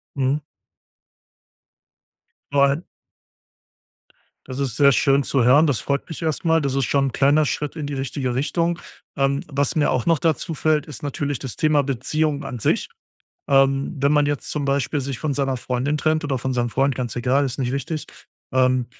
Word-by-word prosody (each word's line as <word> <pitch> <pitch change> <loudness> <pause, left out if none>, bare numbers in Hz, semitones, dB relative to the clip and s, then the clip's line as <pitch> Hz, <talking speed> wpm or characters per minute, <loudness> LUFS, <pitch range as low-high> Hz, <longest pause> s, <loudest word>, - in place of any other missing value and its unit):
Mhm. 135 +1 +1 2.1
Nein. 140 +3 +3 1.6
Das 130 0 -6
ist 130 -4 -2
sehr 140 -1 +6
schön 140 +2 +3
zu 135 -2 +1
hören, 145 +6 +6
das 135 -7 0
freut 140 0 -2
mich 165 - -7
erst 160 0 -2
mal. 165 0 +3
Das 140 -2 -1
ist 135 -1 +1
schon 140 +2 +1
'n - - -3
kleiner 145 +4 +3
Schritt 150 +1 -3
in 155 -3 -4
die 145 - -4
richtige 135 -1 -3
Richtung. 170 +5 0 0.4
Ähm, 140 0 +1
was 140 0 -1
mir 150 -2 +2
auch 125 - 0
noch 165 -3 +3
dazu 165 +2 0
fällt, 155 0 +1
ist 150 -3 -9
natürlich 145 -2 -2
das 130 - -6
Thema 155 -2 +2
Beziehung 145 +3 -1
an 125 - -5
sich. - - 0 0.6
Ähm, 135 +2 +3
wenn 140 +2 +3
man 145 -1 +3
jetzt 145 -1 -3
zum 150 -2 -2
Beispiel 140 +1 0
sich 135 -2 -4
von 150 -3 -2
seiner 135 -1 0
Freundin 130 +5 -1
trennt 155 +1 +1
oder 135 -3 -1
von 130 +2 -2
seinem 120 -1 0
Freund, 135 +3 +1
ganz 120 -3 -4
egal, 130 +4 +2
ist 130 -1 -4
nicht 125 -2 -1
wichtig, 145 +2 -3 0.5
ähm, 130 -1 +2
140 Hz, 185 wpm, -22 LUFS, 130-150 Hz, 2.1 s, sehr